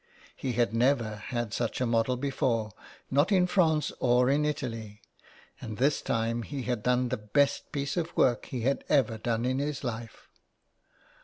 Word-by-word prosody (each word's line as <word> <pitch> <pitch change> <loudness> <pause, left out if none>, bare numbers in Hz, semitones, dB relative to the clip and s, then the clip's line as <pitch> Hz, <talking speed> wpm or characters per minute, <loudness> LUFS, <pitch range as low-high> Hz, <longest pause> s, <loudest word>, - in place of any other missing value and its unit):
He 130 - -3
had 120 -1 +1
never 115 -3 +2
had 120 0 -4
such 120 -1 -2
a 130 - +1
model 115 +2 +1
before, 120 -5 -1 0.4
not 145 +8 +3
in 185 -2 +5
France 160 -6 +2
or 125 +1 +3
in 150 +2 +2
Italy, 115 -8 -4 0.6
and 110 -2 -6
this 140 +4 +2
time 115 +1 -1
he 135 +3 -5
had 125 -3 -2
done 125 +1 +1
the 130 - -1
best 135 +7 0
piece 140 -1 -2
of 170 0 -3
work 120 -3 +3
he 125 - -4
had 135 +4 0
ever 120 -6 +2
done 115 +1 -1
in 130 +1 0
his 145 0 -3
life. 115 -2 -6
125 Hz, 170 wpm, -29 LUFS, 115-140 Hz, 0.6 s, in